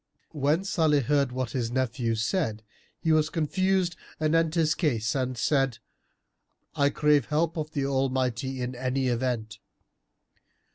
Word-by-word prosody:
When 150 Hz, +4 st, +1 dB
Salih 160 Hz, -7 st, +2 dB
heard 140 Hz, 0 st, +1 dB
what 130 Hz, -1 st, -3 dB
his 120 Hz, -3 st, -2 dB
nephew 120 Hz, -2 st, -1 dB
said, 110 Hz, -, -1 dB, 0.3 s
he 160 Hz, -, 0 dB
was 155 Hz, 0 st, +3 dB
confused 180 Hz, +3 st, 0 dB, 0.2 s
anent 160 Hz, +1 st, +2 dB
his 160 Hz, -2 st, +3 dB
case 115 Hz, -, 0 dB
and 130 Hz, -2 st, -2 dB
said, 135 Hz, 0 st, +1 dB, 1.0 s
"I 140 Hz, 0 st, +3 dB
crave 150 Hz, -2 st, +3 dB
help 160 Hz, +2 st, 0 dB
of 155 Hz, -1 st, -4 dB
the 140 Hz, -2 st, -1 dB
Almighty 130 Hz, -1 st, -1 dB
in 125 Hz, +1 st, -3 dB
any 130 Hz, +1 st, -1 dB
event." 115 Hz, -3 st, -2 dB
135 Hz, 135 wpm, -27 LUFS, 125-155 Hz, 1.0 s, was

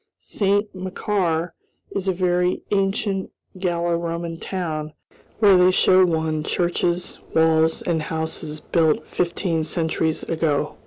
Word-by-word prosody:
Saint 205 Hz, +1 st, 0 dB
Macaire 185 Hz, -2 st, -1 dB, 0.4 s
is 195 Hz, -1 st, -3 dB
a -, -, +4 dB
very 180 Hz, 0 st, 0 dB
ancient 195 Hz, 0 st, 0 dB, 0.3 s
Gallo 175 Hz, -2 st, 0 dB
Roman 170 Hz, 0 st, -4 dB
town, 155 Hz, -5 st, -4 dB, 0.4 s
where 205 Hz, -3 st, +6 dB
they 180 Hz, 0 st, +6 dB
show 185 Hz, 0 st, +5 dB
one 160 Hz, -2 st, -1 dB
churches, 175 Hz, +1 st, -1 dB, 0.2 s
walls, 160 Hz, 0 st, +3 dB
and 165 Hz, -2 st, 0 dB
houses 160 Hz, 0 st, -3 dB
built 160 Hz, -1 st, +1 dB
fifteen 170 Hz, -2 st, -1 dB
centuries 160 Hz, -1 st, -1 dB
ago. 155 Hz, -3 st, -1 dB
170 Hz, 115 wpm, -22 LUFS, 160-185 Hz, 0.4 s, where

